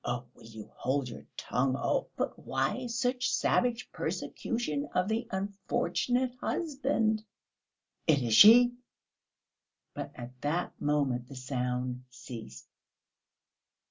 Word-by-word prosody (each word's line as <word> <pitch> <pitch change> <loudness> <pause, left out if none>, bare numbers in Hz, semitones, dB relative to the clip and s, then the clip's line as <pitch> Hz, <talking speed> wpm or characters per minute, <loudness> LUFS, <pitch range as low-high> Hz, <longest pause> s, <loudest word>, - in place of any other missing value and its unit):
"Oh, 120 0 -2
will 115 - -17
you 110 -2 -10
hold 130 0 -1
your - - -10
tongue? 130 +1 0
Oh!..." - - 0
"But - - -2
why 255 -1 -1
such 245 +1 0
savage 245 -1 +1
persecution 150 - -3
of 180 +1 +2
the 225 +2 -1
unfortunate 240 +5 -1
husband?..." 265 -9 0 0.8
"It 145 -5 +4
is 115 -2 0
she!" 240 - +9 1.2
But - - -5
at 125 +1 -10
that 165 +5 -2
moment 140 -5 +1
the 140 - -9
sound 125 -1 -2
ceased. 120 - -9
150 Hz, 110 wpm, -30 LUFS, -, 1.2 s, she